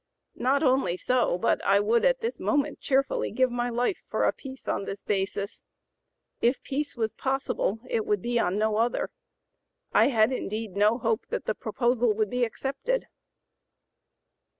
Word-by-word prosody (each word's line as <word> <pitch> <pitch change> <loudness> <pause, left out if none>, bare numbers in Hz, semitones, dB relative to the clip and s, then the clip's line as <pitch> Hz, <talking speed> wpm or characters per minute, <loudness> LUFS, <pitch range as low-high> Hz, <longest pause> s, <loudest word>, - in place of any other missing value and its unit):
Not 270 +5 +2
only 260 - +2
so, 250 -4 +1
but - - +1
I 200 0 +4
would 225 +3 +2
at - - +3
this 465 +1 -3
moment 290 -1 0
cheerfully 270 0 +1
give 255 -1 +1
my 245 0 -1
life 245 - -1
for - - 0
a - - +3
peace 265 -1 -10
on 200 - -1
this 195 0 -6
basis. 200 +1 -2 0.8
If 245 +3 +2
peace 285 -1 -3
was 220 -2 -1
possible, 265 -5 -1
it 225 -2 -1
would 205 -3 +1
be 240 0 +1
on 180 -2 +1
no 215 0 +1
other. 235 +2 0 0.8
I - - +6
had 225 -3 +3
indeed 220 -3 -3
no 210 +3 +4
hope 225 -1 -1
that - - -3
the - - 0
proposal 240 -2 +1
would 215 -1 0
be 250 0 +1
accepted." 275 - -2
240 Hz, 165 wpm, -27 LUFS, 215-265 Hz, 0.8 s, I